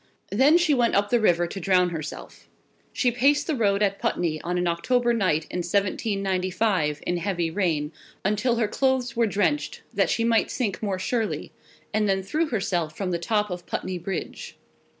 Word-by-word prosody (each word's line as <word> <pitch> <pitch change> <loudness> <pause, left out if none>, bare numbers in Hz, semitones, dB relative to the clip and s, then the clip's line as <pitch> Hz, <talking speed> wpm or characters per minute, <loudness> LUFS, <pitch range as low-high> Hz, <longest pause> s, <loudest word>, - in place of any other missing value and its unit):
Then 295 +5 +5
she 335 -4 +3
went 240 -3 +2
up 205 +1 +1
the 240 - +4
river 175 -5 +3
to 185 +3 -6
drown 180 0 +3
herself. 155 -3 -7 0.4
She 245 - +1
paced 280 +5 +3
the 320 - -1
road 205 -4 +2
at 200 -1 0
Putney 160 -3 -1
on 175 +1 -2
an 180 - 0
October 240 +9 +1
night, 185 -8 +1
in 180 - -2
1795, 190 -3 0
in 175 - 0
heavy 175 -3 -1
rain, 160 -5 0 0.3
until 210 +5 +1
her 230 -2 +1
clothes 255 0 0
were 230 -1 +2
drenched, 210 +9 -1
that - - +2
she 230 - +1
might 230 -1 +2
sink 220 -7 -2
more 200 -3 -1
surely, 220 +3 -2 0.4
and 210 -1 +1
then 190 0 +1
threw 310 - 0
herself 175 - -2
from 190 -2 -2
the 170 - -1
top 210 +2 0
of 175 -1 -6
Putney 185 -1 -3
Bridge. 190 +3 -6
200 Hz, 180 wpm, -25 LUFS, 175-235 Hz, 0.4 s, Then